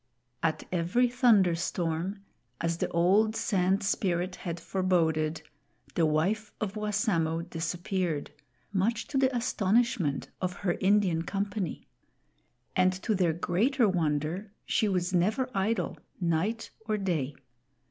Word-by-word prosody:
At 155 Hz, -1 st, 0 dB
every 180 Hz, +8 st, +2 dB
thunderstorm, 190 Hz, -5 st, +2 dB, 0.4 s
as 170 Hz, 0 st, -1 dB
the -, -, -1 dB
old 200 Hz, +6 st, +3 dB
Sand 195 Hz, -1 st, +1 dB
Spirit 185 Hz, -2 st, 0 dB
had 170 Hz, -1 st, -5 dB
foreboded, 160 Hz, -5 st, +1 dB, 0.5 s
the 165 Hz, -2 st, +3 dB
wife 195 Hz, +8 st, 0 dB
of 205 Hz, -2 st, -2 dB
Wassamo 200 Hz, -6 st, 0 dB
disappeared, 175 Hz, -1 st, -2 dB, 0.4 s
much 225 Hz, +5 st, +1 dB
to 275 Hz, -, +1 dB
the 265 Hz, -1 st, +4 dB
astonishment 215 Hz, -, +1 dB
of 185 Hz, -1 st, -1 dB
her 175 Hz, -, +3 dB
Indian 190 Hz, -4 st, +3 dB
company. 200 Hz, 0 st, -3 dB, 0.9 s
And 185 Hz, 0 st, +4 dB
to 220 Hz, -, +1 dB
their 180 Hz, -5 st, +2 dB
greater 215 Hz, -, +2 dB
wonder 170 Hz, +2 st, -1 dB
she 215 Hz, -3 st, +1 dB
was 180 Hz, -1 st, 0 dB
never 210 Hz, +9 st, +2 dB
idle, 195 Hz, -2 st, -1 dB, 0.2 s
night 180 Hz, +6 st, -1 dB, 0.2 s
or 215 Hz, -1 st, +1 dB
day. 160 Hz, -8 st, -1 dB
185 Hz, 115 wpm, -29 LUFS, 170-210 Hz, 0.9 s, the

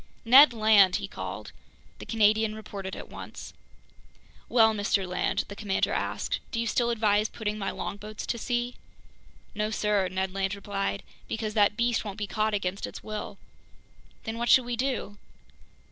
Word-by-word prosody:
"Ned 265 Hz, +5 st, +9 dB
Land!" 215 Hz, -5 st, +5 dB
he -, -, -2 dB
called. -, -, -7 dB, 0.5 s
The -, -, -9 dB
Canadian 215 Hz, 0 st, +3 dB
reported 200 Hz, -3 st, -7 dB
at -, -, -8 dB
once. -, -, -9 dB, 1.0 s
"Well, 220 Hz, -2 st, +5 dB
Mr. 205 Hz, -2 st, 0 dB
Land," 180 Hz, 0 st, 0 dB
the 200 Hz, -, -8 dB
commander 200 Hz, -2 st, 0 dB
asked, -, -, -2 dB
"do 230 Hz, -, -3 dB
you 230 Hz, -, 0 dB
still 235 Hz, +1 st, +1 dB
advise 215 Hz, -2 st, +2 dB
putting 215 Hz, -1 st, -4 dB
my 195 Hz, -, -2 dB
longboats 210 Hz, +1 st, -6 dB
to 235 Hz, -, -2 dB
sea?" 245 Hz, +1 st, -2 dB, 0.8 s
"No, 210 Hz, 0 st, -1 dB
sir," 210 Hz, -3 st, +1 dB
Ned 185 Hz, +1 st, -2 dB
Land 195 Hz, +1 st, -1 dB
replied, 200 Hz, 0 st, -3 dB, 0.2 s
"because 220 Hz, -1 st, -3 dB
that 210 Hz, -1 st, +3 dB
beast 235 Hz, -1 st, +1 dB
won't 205 Hz, -3 st, -6 dB
be 210 Hz, -, -2 dB
caught 215 Hz, +1 st, 0 dB
against 195 Hz, 0 st, -2 dB
its -, -, -10 dB
will." 215 Hz, -1 st, -6 dB, 0.9 s
"Then 225 Hz, +1 st, -5 dB
what 240 Hz, 0 st, -1 dB
should 255 Hz, +1 st, +6 dB
we 240 Hz, 0 st, -2 dB
do?" 235 Hz, -5 st, -2 dB
215 Hz, 160 wpm, -27 LUFS, 200-225 Hz, 1.0 s, Ned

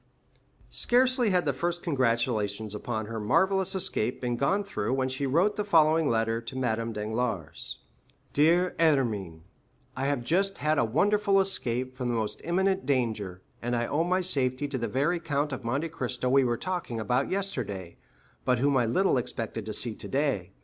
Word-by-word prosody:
20355m -, -, -11 dB
Scarcely 250 Hz, -1 st, +4 dB
had 180 Hz, -3 st, +2 dB
the 145 Hz, -, +1 dB
first 175 Hz, +6 st, -2 dB
congratulations 115 Hz, -, 0 dB
upon 110 Hz, +1 st, -3 dB
her 115 Hz, +1 st, -5 dB
marvellous 190 Hz, -, +2 dB
escape 125 Hz, -, -1 dB
been 120 Hz, -1 st, -1 dB
gone 165 Hz, +12 st, +1 dB
through 125 Hz, -, -3 dB
when 130 Hz, -1 st, 0 dB
she 130 Hz, +1 st, -2 dB
wrote 175 Hz, +11 st, +2 dB
the 210 Hz, -, 0 dB
following 160 Hz, -5 st, +4 dB
letter 115 Hz, 0 st, 0 dB
to 120 Hz, +3 st, -7 dB
Madame 115 Hz, -2 st, -1 dB
Danglars:— 110 Hz, -4 st, -3 dB, 0.6 s
"Dear 170 Hz, +5 st, +3 dB
Hermine,—I 110 Hz, -, -2 dB
have 140 Hz, -4 st, -1 dB
just 195 Hz, +8 st, +1 dB
had 155 Hz, 0 st, +1 dB
a -, -, +3 dB
wonderful 200 Hz, -, +2 dB
escape 130 Hz, -10 st, -1 dB
from 125 Hz, -1 st, -3 dB
the 120 Hz, -, 0 dB
most 110 Hz, -2 st, -3 dB
imminent 190 Hz, +1 st, +1 dB
danger, 110 Hz, -9 st, -1 dB, 0.2 s
and 120 Hz, +1 st, -1 dB
I 120 Hz, 0 st, 0 dB
owe 150 Hz, +6 st, 0 dB
my 185 Hz, +2 st, +1 dB
safety 140 Hz, -5 st, 0 dB
to 135 Hz, -2 st, -3 dB
the 115 Hz, -, -1 dB
very 150 Hz, +7 st, 0 dB
Count 145 Hz, -3 st, -1 dB
of 130 Hz, -, -6 dB
Monte 140 Hz, +8 st, -1 dB
Cristo 125 Hz, -5 st, -2 dB
we 135 Hz, +1 st, +5 dB
were 120 Hz, -2 st, 0 dB
talking 175 Hz, -10 st, -3 dB
about 125 Hz, +5 st, 0 dB
yesterday, 115 Hz, -, -3 dB, 0.5 s
but 125 Hz, -1 st, +2 dB
whom 140 Hz, +2 st, +2 dB
I 120 Hz, -2 st, +2 dB
little 160 Hz, +3 st, +2 dB
expected 115 Hz, -3 st, -4 dB
to 110 Hz, -, -3 dB
see 115 Hz, +1 st, +2 dB
today. 130 Hz, -9 st, -2 dB
130 Hz, 175 wpm, -28 LUFS, 115-170 Hz, 0.6 s, we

